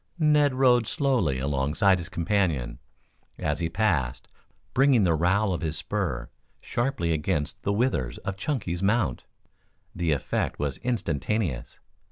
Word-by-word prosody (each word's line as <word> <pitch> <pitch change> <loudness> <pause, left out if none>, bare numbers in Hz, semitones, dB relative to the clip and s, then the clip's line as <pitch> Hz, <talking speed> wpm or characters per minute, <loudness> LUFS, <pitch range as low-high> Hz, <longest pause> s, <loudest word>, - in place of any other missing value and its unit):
Ned 150 -4 +3
rode 125 -3 +4
slowly 125 - +1
alongside 75 +9 +2
his 85 - -7
companion, 85 - 0 0.6
as 75 0 -1
he 85 -1 -1
passed, 80 - 0 0.5
bringing 135 -4 +4
the 85 -3 +3
rowel 95 +5 +2
of 85 - -3
his 80 -1 -2
spur 90 -10 -2 0.3
sharply 120 -9 -1
against 75 -1 -2
the 100 - -1
withers 100 - 0
of 95 - -2
Chunky's 95 - -2
mount. 100 - +1 0.7
The 85 -2 0
effect 70 -3 -1
was 70 -2 -2
instantaneous. 95 - -2
90 Hz, 130 wpm, -26 LUFS, 75-115 Hz, 0.7 s, rode